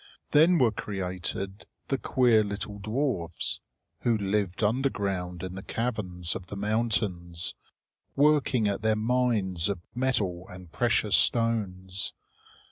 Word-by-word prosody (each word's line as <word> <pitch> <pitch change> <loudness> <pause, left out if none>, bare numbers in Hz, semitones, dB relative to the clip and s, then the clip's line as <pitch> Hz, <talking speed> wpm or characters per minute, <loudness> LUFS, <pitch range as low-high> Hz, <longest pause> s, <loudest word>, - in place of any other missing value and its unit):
Then 165 +4 +6
were 125 -7 +4
created 95 0 -4 0.3
the 135 - +1
queer 120 -4 +4
little 100 0 -5
dwarfs, 105 - -1 0.4
who 115 -2 +2
lived 100 -1 -1
underground 100 -7 0
in 95 -1 -4
the 95 - -6
caverns 95 -8 -2
of 90 - -7
the 100 - -6
mountains, 100 -5 -1 0.6
working 140 -6 +4
at 100 +1 -1
their 110 0 +3
mines 110 -6 +1
of 100 - 0 0.2
metal 100 -9 0
and 90 -2 -11
precious 110 -2 +2
stones. 100 -5 +1
105 Hz, 120 wpm, -28 LUFS, 95-115 Hz, 0.6 s, Then